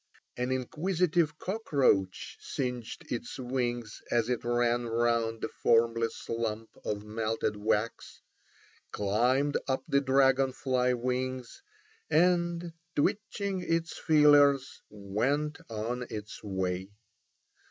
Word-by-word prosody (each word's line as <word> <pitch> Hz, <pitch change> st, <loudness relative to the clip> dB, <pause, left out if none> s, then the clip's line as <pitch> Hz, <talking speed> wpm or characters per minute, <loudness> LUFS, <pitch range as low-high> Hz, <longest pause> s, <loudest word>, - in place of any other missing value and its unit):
An 125 Hz, +1 st, -2 dB
inquisitive 160 Hz, +4 st, 0 dB
cockroach 140 Hz, -, 0 dB
singed 125 Hz, -3 st, -4 dB
its 120 Hz, -, -4 dB
wings 120 Hz, -3 st, -3 dB
as 120 Hz, 0 st, +1 dB
it 125 Hz, -2 st, -1 dB
ran 120 Hz, 0 st, +1 dB
round 115 Hz, -1 st, +1 dB
the -, -, -1 dB
formless 115 Hz, 0 st, +2 dB
lump 115 Hz, -1 st, -3 dB
of 105 Hz, -1 st, -3 dB
melted 110 Hz, 0 st, -1 dB
wax, 105 Hz, +2 st, -2 dB, 0.7 s
climbed 125 Hz, +8 st, +2 dB
up 130 Hz, -1 st, 0 dB
the 140 Hz, -, +3 dB
dragon 135 Hz, -1 st, +3 dB
fly 130 Hz, -2 st, +1 dB
wings, 130 Hz, -, -3 dB, 0.5 s
and 175 Hz, 0 st, +2 dB, 0.2 s
twitching 200 Hz, +4 st, -1 dB
its 165 Hz, -1 st, -1 dB
feelers 145 Hz, -3 st, +4 dB
went 120 Hz, +10 st, -1 dB
on 120 Hz, +3 st, -3 dB
its 105 Hz, -1 st, -7 dB
way. 95 Hz, -2 st, -2 dB
125 Hz, 100 wpm, -30 LUFS, 115-145 Hz, 0.7 s, feelers